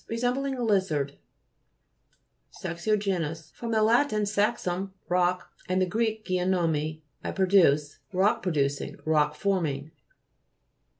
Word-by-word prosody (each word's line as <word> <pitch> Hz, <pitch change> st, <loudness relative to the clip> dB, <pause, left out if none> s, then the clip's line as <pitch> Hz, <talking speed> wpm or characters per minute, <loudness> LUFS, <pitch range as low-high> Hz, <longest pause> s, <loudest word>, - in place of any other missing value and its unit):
Resembling 250 Hz, +4 st, -1 dB
a 250 Hz, -, -3 dB
lizard. 175 Hz, -10 st, +1 dB, 1.5 s
SAXI'GENOUS 175 Hz, -4 st, -1 dB
fr. 235 Hz, -, -7 dB
lat. 230 Hz, +5 st, +3 dB
saxum, 200 Hz, -3 st, 0 dB
rock, 180 Hz, 0 st, +1 dB, 0.2 s
and 185 Hz, -1 st, +1 dB
gr. 225 Hz, -, 0 dB, 0.2 s
geinomai, 165 Hz, -4 st, 0 dB, 0.2 s
I -, -, -3 dB
produce. 170 Hz, -7 st, +3 dB
Rock 195 Hz, +2 st, +2 dB
producing; 145 Hz, -6 st, -1 dB
rock 150 Hz, -1 st, +2 dB
forming. 155 Hz, -6 st, -1 dB
185 Hz, 95 wpm, -27 LUFS, 155-210 Hz, 1.5 s, lat